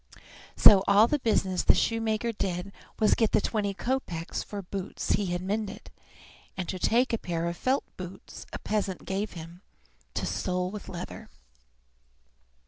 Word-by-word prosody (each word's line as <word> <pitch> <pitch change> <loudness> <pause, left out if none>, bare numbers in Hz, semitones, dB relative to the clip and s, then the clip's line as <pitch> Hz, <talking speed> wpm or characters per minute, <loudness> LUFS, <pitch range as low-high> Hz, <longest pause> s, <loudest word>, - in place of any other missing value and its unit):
So 195 -2 +9
all 205 +2 +7
the 295 +4 +1
business 190 -7 +1
the - - +5
shoemaker 225 0 0
did 195 -2 -3 0.2
was 215 - +3
to - - +6
get 225 -2 +1
the - - +6
twenty 205 -3 -1
kopeks 185 -10 -2
for 205 -1 -6
boots 190 +1 -4
he 200 -1 +2
had 175 0 -2
mended, 205 +1 -3 0.7
and 185 -2 -3
to 185 - -3
take 240 +6 +2
a 230 - +1
pair 170 -1 -2
of 170 - -2
felt 260 +8 +1
boots 180 0 -9
a - - -4
peasant 200 -3 -2
gave 200 +2 -2
him 170 +1 -10 0.5
to - - -1
sole 180 0 -1
with 210 -1 -8
leather. 175 0 -7
200 Hz, 160 wpm, -28 LUFS, 180-215 Hz, 0.7 s, So